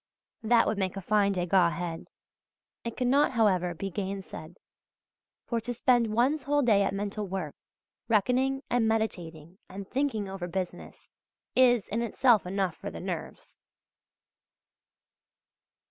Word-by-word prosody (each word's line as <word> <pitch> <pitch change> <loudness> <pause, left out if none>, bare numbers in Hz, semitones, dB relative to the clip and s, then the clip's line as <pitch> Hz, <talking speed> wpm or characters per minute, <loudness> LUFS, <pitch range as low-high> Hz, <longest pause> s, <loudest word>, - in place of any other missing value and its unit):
That 230 +1 +4
would 210 - -1
make 190 0 -2
a - - -2
fine 200 0 +2
Degas 180 -1 +2
head. 170 0 -5 0.8
It 235 - -5
cannot, 265 +3 +3
however, 185 -7 +2
be 195 +3 -5
gainsaid; 190 -4 -6 0.9
for 235 -2 -2
to 245 +2 -4
spend 240 -2 +3
one's 255 +7 +2
whole 290 +2 +1
day 215 -5 +4
at 195 - +1
mental 205 +1 -3
work, 180 -6 -4 0.5
reckoning 255 +5 +1
and 240 -2 +1
meditating 175 -6 -3
and 195 +1 -8
thinking 255 -6 -1
over 190 -2 -5
business, 180 0 -6 0.4
is 245 -5 +4
in 225 +3 -2
itself 235 -3 +3
enough 190 -2 -1
for - - -7
the 85 0 -8
nerves. - - -7
205 Hz, 130 wpm, -28 LUFS, 185-240 Hz, 0.9 s, That